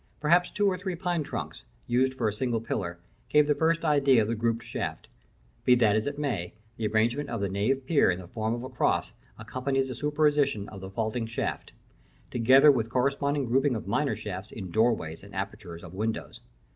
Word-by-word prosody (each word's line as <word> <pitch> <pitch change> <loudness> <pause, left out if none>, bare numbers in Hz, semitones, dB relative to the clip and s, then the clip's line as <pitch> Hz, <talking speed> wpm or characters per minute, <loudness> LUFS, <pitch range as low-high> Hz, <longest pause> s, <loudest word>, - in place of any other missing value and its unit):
Perhaps 170 +4 +3
two 205 +1 0
or 185 -3 +1
three 185 -1 -3
pine 175 -1 -1
trunks, 145 - -6 0.2
used 130 +2 +1
for 120 - 0
a 105 - 0
single 120 +1 -1
pillar, 95 -6 -3 0.3
gave 150 0 +5
the 150 - +3
first 165 +2 +1
idea 140 -6 +4
of - - -3
the 115 - 0
grouped 115 0 -1
shaft. - - -4 0.6
Be 125 - +6
that 110 -4 +3
as 110 +3 0
it 145 0 -3
may, 120 -13 -3 0.2
the 110 -2 -1
arrangement 120 +7 +1
of 115 - -3
the 100 -1 -1
nave 120 +8 0
pier 145 - +4
in 90 - +1
the 90 - -10
form 110 +4 -2
of 120 - -6
a 130 - -6
cross - - 0 0.2
accompanies 130 +4 -2
the - - -3
superimposition 145 -6 +1
of 95 -2 -10
the 95 - -7
vaulting 110 +3 -2
shaft; 115 - -4 0.6
together 130 +5 +6
with 115 -5 -1
corresponding 140 +3 0
grouping 135 +2 +2
of 110 - -5
minor 140 +7 +1
shafts 100 +1 -6
in 95 -5 -7
doorways 110 -8 +1
and 100 0 -13
apertures 95 -3 -6
of 85 -1 -10
windows. 110 +3 -3
120 Hz, 200 wpm, -28 LUFS, 110-140 Hz, 0.6 s, Be